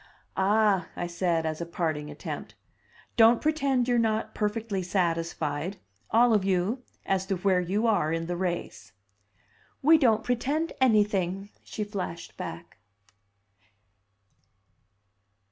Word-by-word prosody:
"Ah!" 200 -2 +3
I 175 - -3
said, 170 -1 0
as 155 +1 -3
a - - -2
parting 155 -3 -2
attempt, 150 - -7 0.6
"don't 230 +1 +7
pretend 275 -5 +1
you're 245 -1 +3
not 220 -1 0
perfectly 210 -2 -2
satisfied 170 -2 -1 0.3
all 235 +1 +5
of 210 -3 +3
you 195 +6 0 0.2
as 190 0 0
to 195 - 0
where 185 0 +2
you 195 +6 0
are 205 -9 +2
in 165 0 -1
the 175 +1 -3
race!" 175 - -4 0.9
"We 315 +3 +7
don't 225 -6 +3
pretend 280 +7 -1
anything!" 205 -5 +2
she 215 - -4
flashed 195 -5 -6
back. - - -8
195 Hz, 120 wpm, -27 LUFS, 175-225 Hz, 0.9 s, don't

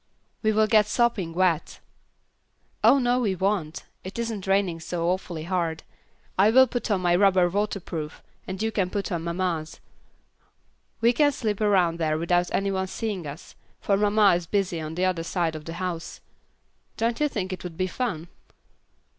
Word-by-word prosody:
"We 215 - +2
will 215 0 +3
get 215 -1 +4
sopping 220 -7 +1
wet." 170 -2 0 1.0
"Oh 280 - +7
no, 245 -1 +2
we 205 -6 0
won't; 185 -4 -1 0.2
it 190 +4 -8
isn't 225 -5 -3
raining 195 -4 +1
so 170 +1 -3
awfully 180 -3 -3
hard. 170 -2 -2 0.6
I 200 +3 +6
will 260 +3 +7
put 245 -2 -4
on 200 -3 +1
my 175 -1 +3
rubber 185 -1 +4
waterproof, 175 -5 -3 0.2
and 190 0 -5
you 225 - 0
can 190 -4 0
put 200 +1 -3
on 170 -2 -2
mamma's. 170 -2 -2 1.2
We 235 +1 +4
can 290 +3 +4
slip 220 -6 -3
around 185 -5 +3
there 155 -1 +1
without 175 +2 +1
any 195 0 0
one 190 0 -1
seeing 195 -4 -4
us, 145 +5 -9 0.3
for 200 - +1
mamma 205 0 +4
is 175 -1 -1
busy 190 -4 -1
on 155 +1 -6
the 180 +2 +1
other 185 -3 0
side 165 -1 -1
of 155 -1 -8
the 165 - -6
house. 175 -1 -5 0.8
Don't 230 +1 0
you 300 - +3
think 195 -8 -3
it 185 - -7
would 170 -3 -7
be 185 - +1
fun?" 185 -4 -3
185 Hz, 175 wpm, -25 LUFS, 170-210 Hz, 1.2 s, Oh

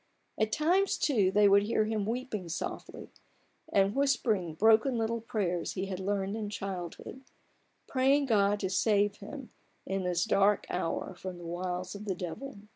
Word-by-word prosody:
At 220 0 +1
times, 355 - +2
too, 215 -10 +2
they 205 +1 +5
would 200 0 +6
hear 215 +1 +1
him 215 -2 -1
weeping 225 -6 -3
softly, 165 - -6 0.6
and 195 0 +3
whispering 245 -9 +1
the 155 - -8
broken 225 - +4
little 230 0 -1
prayers 200 -7 -2
he 190 0 -3
had 190 -1 -5
learned 195 +1 -1
in 215 -2 -4
childhood: 195 +4 -6 0.6
praying 275 +2 +2
God 205 -4 +2
to 190 - -1
save 205 0 +2
him 255 +5 -9 0.3
in 195 0 -2
this 175 -1 0
dark 205 -1 +3
hour 180 +1 -2
from 185 0 -7
the 175 - -10
wiles 180 +1 -4
of 205 +1 -8
the 195 -3 -1
devil. 195 +9 -6
205 Hz, 165 wpm, -30 LUFS, 185-225 Hz, 0.6 s, would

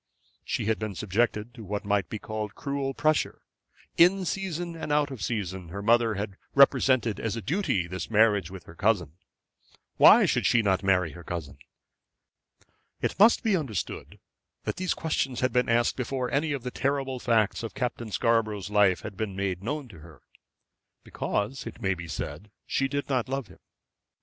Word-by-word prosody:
She - - -2
had 110 0 0
been 110 -3 -4
subjected 105 +3 -1
to 120 -3 -10
what 105 +1 -4
might 100 -3 0
be 110 - -4
called 105 -1 -5
cruel 140 -1 -3
pressure. 155 0 0 0.5
In 185 +2 +5
season 175 -2 -3
and 160 -2 -5
out 145 -1 +2
of 130 -6 -7
season 95 -4 -3
her 100 +4 -6
mother 115 0 +3
had 100 -1 -4 0.2
represented 130 -4 +4
as 115 -1 -2
a - - -3
duty 160 - 0
this 90 +2 -6
marriage 105 -5 +3
with 95 -2 -9
her 80 - -13
cousin. 95 -4 +1 0.9
Why - - +8
should - - +1
she 115 -2 +3
not 95 -2 +2
marry 90 -4 +2
her 85 +4 -11
cousin? 75 -6 -6 1.4
It - - -2
must 220 +3 +6
be 215 -3 +3
understood 135 - -4 0.5
that - - -3
these 185 0 -1
questions 135 -6 -1
had 130 - +1
been 125 -1 +2
asked 115 0 +2
before 125 0 -2
any 145 +4 +1
of 140 -4 -3
the 125 - -4
terrible 135 -1 -1
facts 115 -4 +1
of 115 - -6
Captain 120 -2 -3
Scarborough's 110 -3 0
life 105 -3 +4
had 105 -3 -7
been 105 -1 -4
made 95 -2 -2
known 145 +6 -3
to 85 - -13
her. 80 -3 -15 0.8
Because, 105 +6 -3
it 115 - -8
may 95 0 +1
be 85 -1 -8
said, 100 +5 -6 0.2
she 135 - 0
did 140 +1 -3
not 130 -3 -1
love 135 -6 -3
him. 90 - -16
115 Hz, 180 wpm, -27 LUFS, 100-135 Hz, 1.4 s, Why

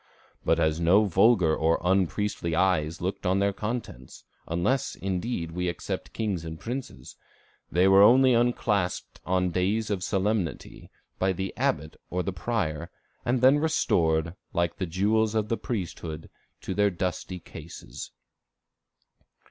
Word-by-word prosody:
But 80 - +2 0.2
no 95 +6 +5
vulgar 95 -3 +4
or 80 +1 +2
unpriestly 95 -1 0
eyes 85 -3 +1
looked 95 +3 -3
on 95 +1 +2
their 100 0 +1
contents, 105 - -6 0.2
unless, 85 +11 0
indeed, 90 -2 -3
we 90 +1 -2
except 85 - -4
kings 100 -7 -2
and 80 -1 -7
princes; 120 - -6 0.6
they 90 +3 +4
were 95 0 +7
only 130 +5 +7
unclasped 115 -5 0
on 90 -1 +1
days 100 +5 0
of 95 -3 -1
solemnity, 95 -5 -2 0.3
by 95 0 +2
the 95 +1 -4
abbot 80 +1 -1
or 90 0 -1
the 95 - -3
prior, 85 -6 -2 0.4
and 120 0 +1
then 135 +3 +6
restored, 85 - +1 0.2
like 85 -1 0
the 95 - -2
jewels 105 +5 +1
of 105 -1 0
the 115 - +1
priesthood, 85 - -5 0.3
to - - -4
their 105 +1 +3
dusty 90 0 -3
cases." 80 -1 -10
95 Hz, 135 wpm, -27 LUFS, 85-110 Hz, 0.6 s, were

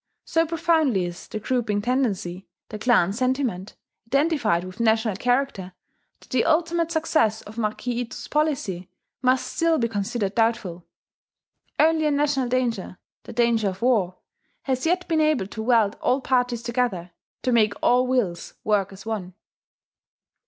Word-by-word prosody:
So 330 0 +1
profoundly 315 - +2
is 175 0 -8
the 215 - -5
grouping 220 -2 0
tendency, 205 -6 -1 0.2
the 215 - -6
clan 210 -5 +3
sentiment, 250 -5 -1 0.3
identified 275 - +1
with 185 +3 -10
national 220 -2 +2
character, 245 -7 -1 0.5
that - - -20
the 255 - +2
ultimate 335 +1 +1
success 310 -9 +1
of 220 +3 -9
Marquis 235 +2 -2
Ito's 235 -2 -7
policy 260 - -1 0.3
must 255 0 +2
still 330 -1 +1
be 235 - +1
considered 205 -1 -2
doubtful. 215 -7 -1 0.9
Only 315 0 +3
a - - +2
national 285 -3 +1
danger 235 -7 -1 0.3
the 240 - -9
danger 230 -3 +2
of 190 +3 -7
war, 205 -8 +2 0.5
has 260 +2 -1
yet 360 +2 0
been 320 -2 +2
able 305 -9 +2
to 220 +3 -7
weld 225 -3 +2
all 260 - +2
parties 245 -3 0
together, 235 -8 -1 0.3
to 255 - +1
make 215 -3 +3
all 250 +1 +4
wills 215 -10 -1
work 200 -3 +1
as 195 +2 -12
one. 195 -5 -4
235 Hz, 145 wpm, -24 LUFS, 205-270 Hz, 0.9 s, all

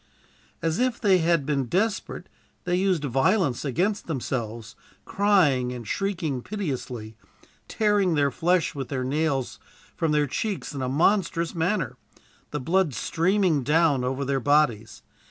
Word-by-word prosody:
"As 165 +3 0
if 250 -1 0
they 195 -4 +4
had 165 -3 +2
been 140 -3 0
desperate, 205 - -1 0.4
they 175 -1 0
used 185 -4 +1
violence 135 - +1
against 180 - -1
themselves, 120 -6 -4 0.3
crying 170 -12 +2
and 120 -3 -7
shrieking 170 -10 -2
piteously, 125 - -5 0.5
tearing 205 -5 +2
their 140 -2 +2
flesh 175 +5 +1
with 135 -4 -5
their 130 -2 -2
nails 140 -1 -1 0.4
from 165 -2 0
their 150 -1 +3
cheeks 195 - -3
in 140 - -4
a 130 - -1
monstrous 170 +3 +1
manner, 165 - -1 0.5
the 150 - -3
blood 165 0 +1
streaming 175 - +1
down 150 -1 +2
over 130 +2 -2
their 135 0 0
bodies. 120 -6 +1
155 Hz, 135 wpm, -25 LUFS, 130-185 Hz, 0.5 s, they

